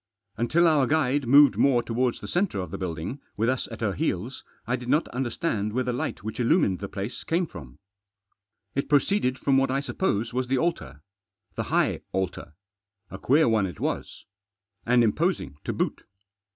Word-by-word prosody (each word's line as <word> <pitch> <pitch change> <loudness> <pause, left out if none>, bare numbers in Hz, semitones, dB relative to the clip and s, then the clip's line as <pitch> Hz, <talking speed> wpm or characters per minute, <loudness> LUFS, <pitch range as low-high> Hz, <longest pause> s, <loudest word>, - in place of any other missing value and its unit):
Until 155 +10 +3
our 150 -5 +3
guide 145 -3 +1
moved 140 +2 +7
more 125 -4 +3
towards 120 +1 -1
the - - -7
centre 175 - 0
of 90 - -5
the - - -4
building, 90 - -4 0.2
with 115 +3 +1
us 130 0 -1
at 115 0 -9
her 105 -3 0
heels, 120 - -3 0.2
I 125 - 0
did 125 -1 -7
not 150 - +2
understand 120 - -2
where 130 +2 0
the 125 0 -2
light 120 - -4
which 110 +3 -5
illumined 120 - +2
the 100 - -5
place 100 +5 -5
came 175 +2 0
from. 70 - -11 1.0
It 140 - -2
proceeded 145 -2 +2
from 135 0 +2
what 135 - +1
I 135 +1 +1
sup 140 - -7
pose 115 - 0
was 130 0 -1
the 130 +1 +1
altar. 75 - -2 0.5
The - - -3
high - - +1
altar. 95 -5 -3 0.6
A 95 - -7
queer 145 +8 +3
one 110 -4 +2
it 90 - -9
was. - - -4 0.6
And 120 0 +5
imposing 115 - 0
to - - -1
boot. - - -2
125 Hz, 185 wpm, -26 LUFS, 105-140 Hz, 1.0 s, moved